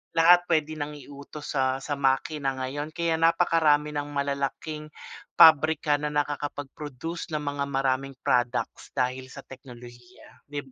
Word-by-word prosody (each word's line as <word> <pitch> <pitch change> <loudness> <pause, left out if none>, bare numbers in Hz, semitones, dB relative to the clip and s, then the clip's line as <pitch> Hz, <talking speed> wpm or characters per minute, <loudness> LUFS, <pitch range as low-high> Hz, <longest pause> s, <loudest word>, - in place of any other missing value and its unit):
Lahat 175 +2 +6
puwede 155 -2 +1
nang 150 +1 -4
iutos 145 +1 -10
sa 130 0 0
sa 145 - -3
makina 135 0 0
ngayon 145 +5 -5
kaya 170 -1 0
napakarami 165 -3 +3
ng 145 -1 -3
malalaking 140 +2 -3 0.5
pabrika 155 -1 +6
na 150 - -2
nakakapag-produce 145 +2 -4
ng 150 - -2
mga 145 0 -2
maraming 135 0 -1
products 125 0 -1
dahil 130 +1 -1
sa 140 +1 -11
teknolohiya 125 -1 -14
'dib 145 -2 -7
145 Hz, 130 wpm, -26 LUFS, 135-155 Hz, 0.5 s, Lahat